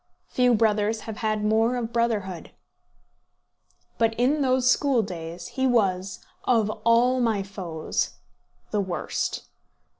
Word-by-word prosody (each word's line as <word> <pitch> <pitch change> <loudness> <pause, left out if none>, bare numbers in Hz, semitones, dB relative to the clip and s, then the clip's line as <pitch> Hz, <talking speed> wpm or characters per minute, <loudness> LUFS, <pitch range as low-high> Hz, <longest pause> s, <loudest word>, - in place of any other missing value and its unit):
Few 250 -1 +3
brothers 215 0 +1
have 220 -2 -7
had 215 -1 -1
more 225 +3 +2
of 235 -2 -4
brotherhood. 210 -7 -1 1.5
But 225 -1 +2
in 270 +6 +2
those 255 -1 +2
school 255 -2 +3
days 175 -2 -7
he 265 0 0
was, 190 -6 0 0.2
of 225 -4 +2
all 240 +2 +4
my 220 -4 +1
foes, 180 -5 -3 0.6
the 210 - +1
worst. 180 -4 -3
220 Hz, 120 wpm, -25 LUFS, 195-245 Hz, 1.5 s, all